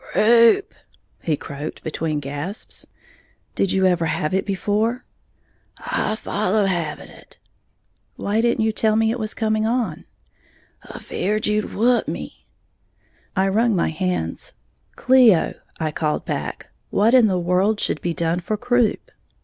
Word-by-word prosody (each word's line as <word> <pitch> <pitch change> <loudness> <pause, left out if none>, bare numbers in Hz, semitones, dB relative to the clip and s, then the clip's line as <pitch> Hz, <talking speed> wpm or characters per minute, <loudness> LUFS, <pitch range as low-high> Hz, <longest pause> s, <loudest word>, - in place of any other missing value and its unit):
"Croup," 230 - +5 0.5
he 155 -3 -1
croaked, 145 +3 -7
between 155 -1 -2
gasps. 145 - -6 0.7
"Did 195 - 0
you 190 0 +2
ever 175 -3 +2
have 155 +2 -1
it 190 +2 0
before?" 210 +5 -1 0.7
"I 215 - -2
follow 210 -1 0
havin' 170 -5 -2
it." - - -17 0.8
"Why 210 +2 0
didn't 235 -1 +1
you 220 - +2
tell 215 0 +1
me 220 0 +2
it 240 - -3
was 215 -1 -4
coming 215 0 0
on?" 230 -9 -2 0.9
"Afeared 210 +3 -2
you'd 210 0 -1
whup 240 +3 +2
me." - - -7 0.9
I 190 0 +2
wrung 220 +2 +2
my 170 - +1
hands. 160 - -3 0.4
"Cleo," 250 -9 +4 0.3
I 155 -1 -1
called 150 0 -2
back, - - -5 0.2
"what 220 +4 +2
in 250 -4 +6
the 185 -3 +1
world 180 +5 +1
should - - -1
be 170 -1 -2
done 170 +1 0
for 210 +5 -3
croup?" 245 -1 0
205 Hz, 140 wpm, -21 LUFS, 170-220 Hz, 0.9 s, in